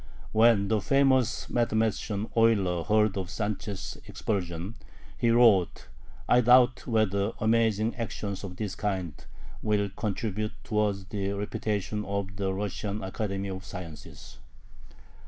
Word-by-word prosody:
When 110 -2 +4
the 110 -1 +1
famous 130 -3 +2
mathematician 110 -2 0
Euler 100 -7 +3
heard 105 -2 +2
of 95 -2 -3
Sanchez' 100 -4 -4
expulsion, 90 -1 -3 0.4
he 120 - +1
wrote: 115 -8 +4 0.4
"I 125 - +5
doubt 125 +1 +5
whether 110 -2 +1
amazing 110 0 +2
actions 105 -4 -4
of 90 -2 -6
this 100 +1 -4
kind 95 -4 -2 0.5
will 105 -2 +1
contribute 105 +1 -3
towards 105 -3 0
the 100 -1 -3
reputation 105 0 -2
of 100 -1 -3
the 95 -1 -1
Russian 100 +1 -3
Academy 100 0 -3
of 95 0 -6
Sciences." 90 -5 -10
105 Hz, 120 wpm, -28 LUFS, 95-110 Hz, 0.5 s, I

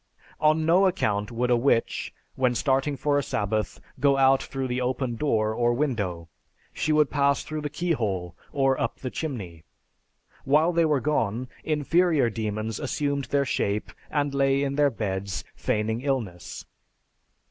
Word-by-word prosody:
On 155 +1 +3
no 180 +4 +5
account 105 - 0
would 125 +1 0
a - - +6
witch, 120 -1 +1 0.2
when 125 -2 +1
starting 135 +2 +1
for 145 0 +1
a - - +1
sabbath, 105 -3 -2 0.2
go 140 -1 +4
out 135 0 +5
through 135 -1 -4
the 125 +1 -2
open 125 -1 -1
door 110 -5 +1
or 120 +1 +2
window; 105 - -2 0.5
she 155 - -1
would 150 -2 +3
pass 140 -1 +2
through 155 -1 -5
the 150 - -3
keyhole 110 - -2 0.2
or 135 -1 +1
up 115 - -1
the 130 - -5
chimney. 100 - -5 0.8
While 155 +5 +3
they 170 0 +3
were 150 -4 +2
gone, 125 -4 -1
inferior 155 -3 +2
demons 110 0 -3
assumed 140 -2 -1
their 140 -1 +1
shape, 105 -5 -1 0.2
and 145 -1 0
lay 135 0 +2
in 140 -1 -1
their 145 0 +3
beds, 100 -5 -3
feigning 110 +2 -1
illness. 120 -11 -3
135 Hz, 155 wpm, -26 LUFS, 110-145 Hz, 0.8 s, a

